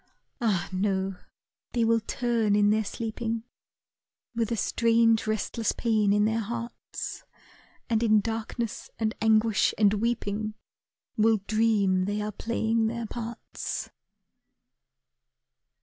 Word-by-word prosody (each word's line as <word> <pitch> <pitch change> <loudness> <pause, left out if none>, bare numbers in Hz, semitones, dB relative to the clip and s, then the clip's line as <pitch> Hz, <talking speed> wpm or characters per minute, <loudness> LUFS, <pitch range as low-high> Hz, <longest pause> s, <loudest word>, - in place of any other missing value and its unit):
Ah, 205 -7 +1
no! 190 0 0 0.6
they 235 -2 +2
will 230 0 +4
turn 225 -2 0
in 205 0 +4
their 220 +1 +2
sleeping 225 +1 -3 0.9
With 230 -1 -1
a 230 - 0
strange 230 +1 +3
restless 220 +1 -1
pain 215 -3 +2
in 210 +1 +4
their 220 +1 +1
hearts, 230 +2 -5 0.6
And 225 -2 +1
in 215 -2 +5
darkness, 225 +1 -4
and 220 -1 0
anguish, 220 -1 +3
and 210 -1 +4
weeping, 215 -1 -1 0.6
Will 220 +1 +4
dream 210 -4 +2
they 205 +1 -1
are 210 0 -2
playing 225 +1 0
their 235 +1 -3
parts. 235 +1 -5
220 Hz, 115 wpm, -27 LUFS, 210-230 Hz, 0.9 s, in